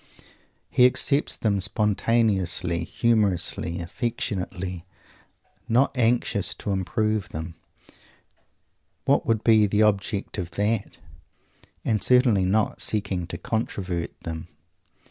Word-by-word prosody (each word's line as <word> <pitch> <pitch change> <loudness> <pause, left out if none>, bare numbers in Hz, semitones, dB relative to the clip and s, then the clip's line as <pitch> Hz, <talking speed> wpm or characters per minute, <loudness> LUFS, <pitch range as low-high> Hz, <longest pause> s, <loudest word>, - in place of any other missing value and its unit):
He 125 - +6
accepts 140 +3 +2
them 100 -3 0
spontaneously, 100 -4 +1
humorously, 100 -6 0
affectionately; 95 -3 -4 0.9
not 125 +5 +2
anxious 115 -4 +1
to 105 - -4
improve 105 +2 -1
them 80 +2 -6 1.5
what - - +2
would 115 -1 +1
be 110 -2 +5
the 105 +2 +2
object 105 0 0
of 85 -2 -4
that? 105 +1 -1 0.9
and 110 -3 +1
certainly 125 -7 +4
not 105 +3 0
seeking 100 -5 0
to 85 - -6
controvert 90 -3 -3
them. 80 -1 -6
105 Hz, 100 wpm, -25 LUFS, 90-115 Hz, 1.5 s, He